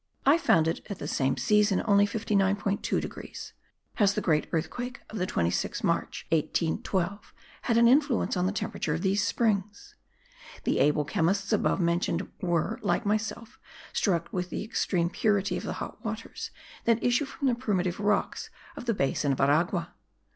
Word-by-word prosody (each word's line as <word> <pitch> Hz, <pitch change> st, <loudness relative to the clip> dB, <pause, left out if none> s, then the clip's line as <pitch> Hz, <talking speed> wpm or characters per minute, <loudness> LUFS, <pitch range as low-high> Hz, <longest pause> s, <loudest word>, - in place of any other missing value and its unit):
I 295 Hz, +5 st, +6 dB
found 165 Hz, -, +3 dB
it 165 Hz, -, -2 dB
at 200 Hz, -, -4 dB
the -, -, -6 dB
same 135 Hz, -1 st, 0 dB
season 210 Hz, -3 st, +3 dB
only 205 Hz, -1 st, +5 dB
59.2 200 Hz, -1 st, 0 dB
degrees. -, -, -8 dB, 0.4 s
Has 200 Hz, -3 st, +3 dB
the -, -, +1 dB
great 155 Hz, -3 st, +1 dB
earthquake 245 Hz, +11 st, -3 dB
of 215 Hz, -, -5 dB
the 180 Hz, -, 0 dB
26th 85 Hz, -, -1 dB
March, -, -, -1 dB
1812, 175 Hz, +4 st, -1 dB, 0.3 s
had 230 Hz, -2 st, +1 dB
an 235 Hz, 0 st, +6 dB
influence 275 Hz, -2 st, +3 dB
on 180 Hz, 0 st, +1 dB
the -, -, 0 dB
temperature 165 Hz, -6 st, -2 dB
of 160 Hz, -, -4 dB
these 195 Hz, +1 st, +2 dB
springs? 210 Hz, -, -1 dB, 0.7 s
The -, -, +1 dB
able 150 Hz, +1 st, +3 dB
chemists 195 Hz, +7 st, 0 dB
above 210 Hz, -, +2 dB
mentioned 170 Hz, +1 st, 0 dB
were, 180 Hz, +5 st, 0 dB
like 210 Hz, -, 0 dB
myself, 220 Hz, +3 st, -2 dB, 0.3 s
struck 170 Hz, -5 st, 0 dB
with 180 Hz, -1 st, -2 dB
the -, -, -3 dB
extreme 180 Hz, -5 st, 0 dB
purity 205 Hz, -1 st, +1 dB
of -, -, -4 dB
the -, -, -2 dB
hot -, -, -7 dB
waters -, -, -5 dB, 0.4 s
that 230 Hz, 0 st, +2 dB
issue 245 Hz, +4 st, +2 dB
from 275 Hz, 0 st, -3 dB
the 250 Hz, -, +3 dB
primitive 200 Hz, -7 st, -1 dB
rocks 205 Hz, 0 st, 0 dB, 0.3 s
of -, -, -8 dB
the 230 Hz, -3 st, +1 dB
basin 140 Hz, -2 st, 0 dB
of 135 Hz, -, -1 dB
Aragua. 165 Hz, +5 st, +1 dB
200 Hz, 165 wpm, -28 LUFS, 170-220 Hz, 0.7 s, I